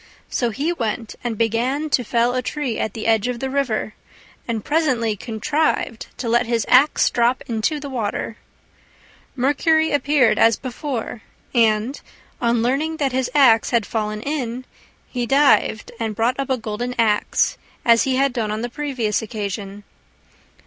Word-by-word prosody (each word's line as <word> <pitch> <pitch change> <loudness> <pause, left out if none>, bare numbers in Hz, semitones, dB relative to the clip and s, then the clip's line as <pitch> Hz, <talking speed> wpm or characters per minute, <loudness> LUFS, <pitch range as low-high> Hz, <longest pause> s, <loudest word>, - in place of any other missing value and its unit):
So 240 - 0
he 285 +10 -1
went 225 -5 -3
and 235 -3 -3
began 240 +7 0
to 250 - +2
fell 235 +1 +1
a 255 - 0
tree 260 -2 -3
at 215 - -2
the 220 - -5
edge 225 0 +2
of 250 -1 -3
the 265 +1 -3
river, 250 -6 -1 0.5
and 225 -3 -3
presently 255 -9 +1
contrived 230 +3 -1
to 245 - -4
let 240 +1 +2
his 235 -1 0
axe 280 +4 +5
drop 240 +2 +1
into 240 +5 -1
the 285 - -7
water. 225 -3 -3 1.0
Mercury 315 +4 +2
appeared 285 -4 +3
as 225 -1 +5
before, 255 -3 -5 0.3
and, 230 +2 +2 0.4
on 235 -1 +2
learning 295 +6 0
that 275 -3 0
his 255 0 -1
axe 240 -6 +5
had 235 -4 +1
fallen 215 -1 -3
in, 255 -4 -3 0.4
he 245 -2 -3
dived 275 -5 +3
and 220 -2 -2
brought 240 +5 0
up 275 - -2
a 260 - +1
golden 235 +2 -4
axe, 215 -3 +1 0.3
as 230 -1 +6
he 265 -1 +1
had 275 0 +2
done 225 -4 -1
on 215 +2 -3
the 240 - -2
previous 250 -6 -2
occasion. 205 -2 -5
240 Hz, 160 wpm, -21 LUFS, 225-270 Hz, 1.0 s, as